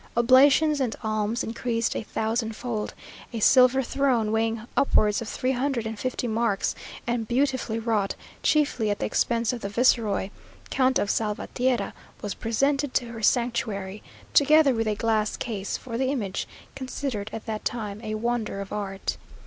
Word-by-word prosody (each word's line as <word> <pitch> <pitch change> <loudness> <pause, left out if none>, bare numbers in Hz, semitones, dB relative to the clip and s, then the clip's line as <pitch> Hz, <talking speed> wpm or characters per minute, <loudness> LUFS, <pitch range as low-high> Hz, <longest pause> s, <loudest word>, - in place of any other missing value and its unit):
Oblations 275 +5 +5
and 245 -4 0
alms 215 +1 -1
increased 230 0 -1
a - - -1
thousand 220 +1 -2
fold; 225 -3 -4 0.4
a 230 - -4
silver 255 +3 +5
throne, 250 -4 +1
weighing 225 0 0
upwards 210 -6 +3
of 225 - -5
three 255 - -1
hundred 260 -2 -1
and 220 -1 -5
fifty 255 -1 -2
marks, 220 -3 0 0.3
and 235 -2 -1
beautifully 255 -2 0
wrought, 220 -3 0 0.3
chiefly 285 -8 +2
at 205 - 0
the - - -2
expense 235 +1 +1
of 240 - -5
the 200 - -3
viceroy, 210 -3 +2 0.4
Count 260 0 +3
of 200 - +1
Salvatierra, 235 +4 -1 0.3
was 205 - -2
presented 275 +5 0
to 245 - +2
her 225 -1 -7
sanctuary, 215 -4 0 0.3
together 295 -1 +6
with 225 -1 -1
a 210 - +1
glass 215 -1 0
case 205 -5 -3
(for 230 -2 -6
the 260 - +1
image), 210 -9 -2 0.3
considered 260 -5 -4
at 225 - -6
that 215 -1 -4
time 215 -3 -3
a 215 0 -3
wonder 225 -2 -2
of 200 -1 -6
art. 195 -2 -3
230 Hz, 160 wpm, -26 LUFS, 215-255 Hz, 0.4 s, together